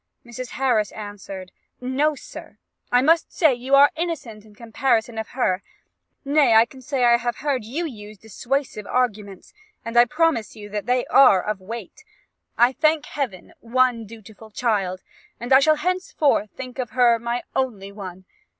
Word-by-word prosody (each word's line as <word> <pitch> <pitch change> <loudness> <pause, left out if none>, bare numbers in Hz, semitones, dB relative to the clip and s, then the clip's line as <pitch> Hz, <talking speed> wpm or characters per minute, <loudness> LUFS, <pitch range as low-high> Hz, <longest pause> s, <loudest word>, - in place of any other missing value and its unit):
Mrs. 240 +1 -7
Harris 240 -6 +1
answered, 200 -3 -8 0.3
'No, 275 +4 0
sir, - - -11 0.3
I 245 +1 +4
must 330 +3 +3
say 315 -6 +3
you 255 +3 +1
are 280 +1 +7
innocent 295 -11 -5
in 210 -1 -19
comparison 230 0 -1
of 220 - -4
her; 185 -7 +1 0.6
nay, 280 -5 +4
I 225 +1 +7
can 260 +2 -15
say 260 0 -2
I 240 0 +6
have 240 -1 -3
heard 275 -5 -2
you 280 +11 -4
use 215 -7 -9
dissuasive 225 +1 -4
arguments; 210 -6 -2 0.3
and 230 +1 -6
I 240 0 +7
promise 300 -4 0
you 205 -1 -10
they 240 +5 -1
are 250 -9 +5
of 210 -2 -3
weight. 230 - -9 0.5
I 240 +1 +6
have, 260 - -14
I - - -42
thank 310 -1 +3
Heaven, 265 -12 -5
one 240 -1 +1
dutiful 220 0 -13
child, 200 -5 -1 0.4
and 245 +3 0
I 265 - +9
shall 310 +2 +4
henceforth 310 - 0
think 255 +3 -9
her 245 -1 +2
my 235 +1 -3
only 215 -7 -2
one. 190 -2 -9
240 Hz, 165 wpm, -22 LUFS, 215-270 Hz, 0.6 s, I